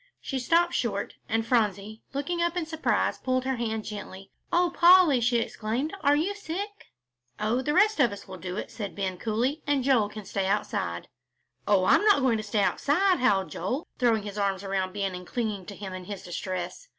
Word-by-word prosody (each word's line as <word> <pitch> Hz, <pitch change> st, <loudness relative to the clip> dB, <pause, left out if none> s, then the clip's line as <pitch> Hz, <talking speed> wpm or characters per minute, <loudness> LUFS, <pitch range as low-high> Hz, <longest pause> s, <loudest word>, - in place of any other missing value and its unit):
She 270 Hz, -, -3 dB
stopped 335 Hz, +7 st, +2 dB
short, 205 Hz, -5 st, -1 dB, 0.2 s
and 225 Hz, +1 st, 0 dB
Phronsie, 215 Hz, -2 st, 0 dB
looking 290 Hz, +5 st, -2 dB
up 345 Hz, +1 st, 0 dB
in 345 Hz, -, -1 dB
surprise, 320 Hz, 0 st, 0 dB
pulled 255 Hz, 0 st, 0 dB
her 265 Hz, -1 st, -1 dB
hand 220 Hz, -2 st, -2 dB
gently. 195 Hz, -2 st, -8 dB, 0.2 s
"Oh, 350 Hz, 0 st, +3 dB
Polly," 345 Hz, -7 st, +6 dB
she 240 Hz, +1 st, +2 dB
exclaimed, 235 Hz, -, -2 dB
"are 290 Hz, -1 st, +4 dB
you 335 Hz, +7 st, 0 dB
sick?" 405 Hz, +1 st, -6 dB, 0.5 s
"Oh, 220 Hz, +4 st, +1 dB
the 295 Hz, +3 st, -1 dB
rest 420 Hz, 0 st, +4 dB
of 245 Hz, -6 st, +4 dB
us 200 Hz, -, -9 dB
will 190 Hz, -1 st, -8 dB
do 180 Hz, +2 st, -5 dB
it," -, -, -5 dB
said 205 Hz, -4 st, -6 dB
Ben, 190 Hz, -2 st, -3 dB
coolly, 240 Hz, +7 st, -1 dB
"and 285 Hz, -2 st, +2 dB
Joel 245 Hz, -6 st, +3 dB
can 210 Hz, -1 st, -9 dB
stay 195 Hz, 0 st, -2 dB
outside." 95 Hz, -, -2 dB, 0.6 s
"Oh, 195 Hz, -3 st, +4 dB
I'm -, -, +5 dB
not 415 Hz, -8 st, +5 dB
going 250 Hz, -4 st, +3 dB
to -, -, -3 dB
stay 205 Hz, -1 st, 0 dB
outside," 360 Hz, -, +2 dB
howled 200 Hz, -7 st, +2 dB
Joel, 250 Hz, -, -3 dB
throwing 230 Hz, -4 st, +2 dB
his 205 Hz, 0 st, -6 dB
arms 195 Hz, -1 st, 0 dB
around 190 Hz, -1 st, -1 dB
Ben 195 Hz, -1 st, -2 dB
and 180 Hz, 0 st, -8 dB
clinging 215 Hz, -6 st, -3 dB
to 200 Hz, -, -7 dB
him 195 Hz, -2 st, -7 dB
in 185 Hz, -1 st, -7 dB
his 200 Hz, -1 st, -7 dB
distress. 180 Hz, -, -5 dB
225 Hz, 200 wpm, -27 LUFS, 200-290 Hz, 0.6 s, Polly